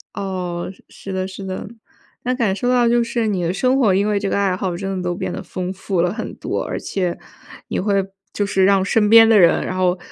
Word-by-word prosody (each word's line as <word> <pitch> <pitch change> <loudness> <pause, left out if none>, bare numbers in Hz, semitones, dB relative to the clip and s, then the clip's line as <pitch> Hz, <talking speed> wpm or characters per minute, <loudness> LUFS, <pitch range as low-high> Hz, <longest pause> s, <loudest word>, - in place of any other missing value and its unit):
哦， 180 -3 -4
是 - - -24
是 195 - -8
的， 185 0 -2
是 190 +1 -9
的。 190 +2 -5 0.6
那 250 - 0
感 225 -7 0
受 245 - -2
到 245 -1 +3
就 240 0 +3
是 235 -1 -1
你 190 -4 -1
的 170 - 0
生 255 +7 +1
活， 215 -8 +4
因 200 +2 +2
为 210 -1 +1
这 200 -1 -2
个 - - 0
爱 195 -2 +1
好 185 -2 -3
真 195 +1 -4
的 - - -3
都 175 0 -2
变 - - -4
得 - - -5
丰 185 0 -5
富 190 -1 -2
了 175 0 +1
很 225 - -5
多。 - - -3
而 - - -4
且 180 -3 -2 0.5
你 - - -2
会 200 0 +1 0.3
就 205 - 0
是 190 -1 +2
让 195 -1 +4
身 210 +1 +2
边 225 0 +8
的 220 -2 +6
人， 170 -3 +4
然 185 - -3
后 180 0 +2
195 Hz, 265 characters per minute, -20 LUFS, 185-215 Hz, 0.6 s, 边